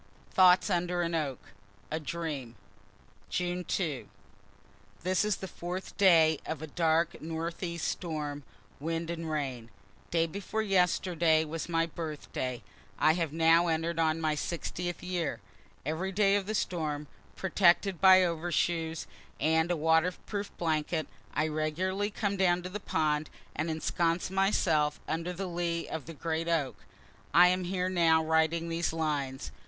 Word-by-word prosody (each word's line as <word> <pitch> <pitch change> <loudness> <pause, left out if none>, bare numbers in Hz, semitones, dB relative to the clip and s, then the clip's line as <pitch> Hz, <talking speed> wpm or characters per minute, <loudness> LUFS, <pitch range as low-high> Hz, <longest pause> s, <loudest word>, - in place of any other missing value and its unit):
THOUGHTS 185 +1 +5
UNDER 175 0 0
AN 170 0 -2
OAK 145 -6 -1 0.5
A 160 - -1
DREAM 150 -7 -4 0.7
June 180 0 -1
2. 160 -8 -2 0.9
This 185 +1 +2
is 210 -2 +1
the 190 - -7
fourth 180 +1 -6
day 165 -5 +5
of 160 -1 -5
a - - -2
dark 165 +1 +1
northeast 165 +1 -3
storm, 150 -4 -3 0.4
wind 165 +2 -2
and 165 -1 -4
rain. 130 -7 -3 0.4
Day 165 -1 +2
before 200 +6 -3
yesterday 175 -4 +2
was 165 +2 -5
my 165 -1 +2
birthday. 150 -7 -5 0.3
I 155 - +4
have 165 -3 -1
now 165 +2 +4
enter'd 165 0 -1
on 160 0 +2
my 155 -1 +1
60th 175 +2 -4
year. 180 -3 -2 0.5
Every 160 +6 -2
day 200 0 +3
of 200 -1 -1
the 215 - -1
storm, 155 -6 -2 0.3
protected 190 -1 +3
by 185 -1 +8
overshoes 165 -1 -1 0.3
and 160 +3 +2
a 175 - +1
waterproof 175 +6 +1
blanket, 160 -1 0 0.3
I 150 - +2
regularly 175 +6 -1
come 200 -1 -2
down 180 -2 +2
to 180 - -5
the 205 +3 -5
pond, 155 -4 0 0.3
and 155 +2 -1
ensconce 165 +2 0
myself 170 -6 +2
under 165 +2 -2
the 185 +2 -4
lee 170 -1 -2
of 160 -3 -5
the 165 - -8
great 165 +3 -2
oak; 140 -11 -1 0.5
I 180 +1 +8
am 185 0 0
here 180 0 -1
now 165 -3 +3
writing 160 +1 +2
these 170 +1 -1
lines. 140 - -2
165 Hz, 145 wpm, -30 LUFS, 155-180 Hz, 0.9 s, by